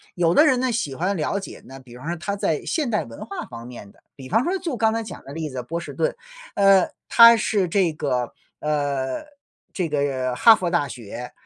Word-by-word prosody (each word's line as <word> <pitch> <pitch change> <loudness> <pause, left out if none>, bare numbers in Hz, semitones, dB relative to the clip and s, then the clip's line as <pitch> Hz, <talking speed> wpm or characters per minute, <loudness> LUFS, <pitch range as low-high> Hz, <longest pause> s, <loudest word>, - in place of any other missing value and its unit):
有 170 -1 +2
的 300 - +6
人 260 -4 +3
呢， 255 -1 0
喜 215 - -2
欢 185 +4 -1
了 180 +6 -1
解 195 - -10
呢， 135 +1 -11
比 125 -2 -14
方 145 +6 -10
说 170 - -1
他 200 +5 -3
在 160 -6 -1
现 300 -7 -1
代 210 - +1
文 115 - -9
化 200 -3 -6
方 115 -1 -9
面 115 -5 -11
的， - - -27
比 130 -2 -11
方 225 +5 +2
说 365 +4 0
就 325 -8 -4
刚 220 -1 +2
才 225 0 -2
讲 190 -5 -10
的 140 - -9
例 160 0 -4
子， 130 -2 -5
波 165 +7 -4
士 170 - -8
顿。 - - -1 0.4
呃， 195 -2 +5 0.2
他 230 0 +9
是 205 -4 0
这 180 -1 +2
个 130 -5 -2 0.3
呃， 145 - -2 0.5
这 180 -4 -2
个 135 -4 -1
哈 225 - +7
佛 180 -4 -2
大 170 -5 +1
学， 120 -1 -8
165 Hz, 240 characters per minute, -23 LUFS, 130-215 Hz, 0.5 s, 他